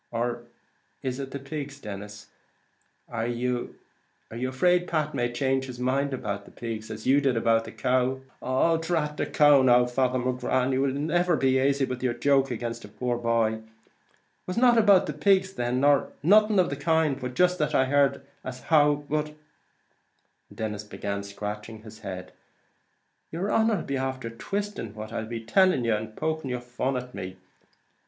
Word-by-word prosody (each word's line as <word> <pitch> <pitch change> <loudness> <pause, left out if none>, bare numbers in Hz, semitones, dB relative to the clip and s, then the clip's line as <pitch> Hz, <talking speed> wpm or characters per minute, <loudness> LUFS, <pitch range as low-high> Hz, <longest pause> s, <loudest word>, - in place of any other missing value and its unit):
Or 120 0 -2 0.6
is 130 0 -3
it 135 -1 -5
the 140 - -5
pigs, 140 0 -6
Denis? 105 -1 -8 0.8
Are 115 -1 -3
you 120 0 -2 0.6
afraid 130 +10 +1
Pat 155 -2 -1
may 120 0 -1
change 135 +1 0
his 125 -2 -8
mind 135 +3 0
about 100 -6 -4
the - - -14
pigs, 110 -2 -6
as - - -7
you 140 +2 +4
did 135 -4 +1
about 115 0 +2
the 110 - -8
cow?" 130 +3 0 0.2
"Oh, 150 +6 +2
drat 160 -2 -1
the - - -1
cow 145 -2 +5
now, 125 -1 +5
Father 125 +1 0
McGrath! 125 0 0
and 130 0 +1
will 140 -1 +1
ye 135 - -4
never 175 +4 +1
be 130 -2 +2
aisy 135 +1 +2
with 125 -1 -5
yer 125 -2 0
joke 135 +2 +2
agin 120 0 -3
a - - -9
poor 120 +4 -2
boy? 115 -2 +1
It 110 - -14 0.8
was 185 - -4
not 245 0 +5
about 205 -4 +5
the 150 - -4
pigs 190 +5 +2
then, 120 -1 -1
nor 145 -1 +3
nothing 210 +4 +5
of 180 -4 +3
the - - -1
kind, 155 -1 +1
but 125 -1 -5
jist 180 +2 +3
that 150 - 0
I 130 - +4
heard 140 0 +2 0.2
as 125 0 -7
how, 145 -2 +3
but 150 +1 0 0.6
" - - -45
and - - -16
Denis 105 -2 -4
began 100 -1 -4
scratching 105 +2 -7
his 110 0 -12
head 95 -3 -7 1.0
"yer 180 +5 -2
honer 220 -3 +2
'll - - -12
be 140 - -2
after 130 -3 -3
twisting 195 - -4
what 110 0 -7
I'll 110 - -3
be 115 -1 -6
tellin' 185 - +3
yer, 115 -1 +2
and 110 0 -6
poking 155 -3 -2
your 125 0 -2
fun 125 +2 -2
at 125 0 -7
me." 95 0 -7
130 Hz, 185 wpm, -26 LUFS, 115-150 Hz, 1.0 s, cow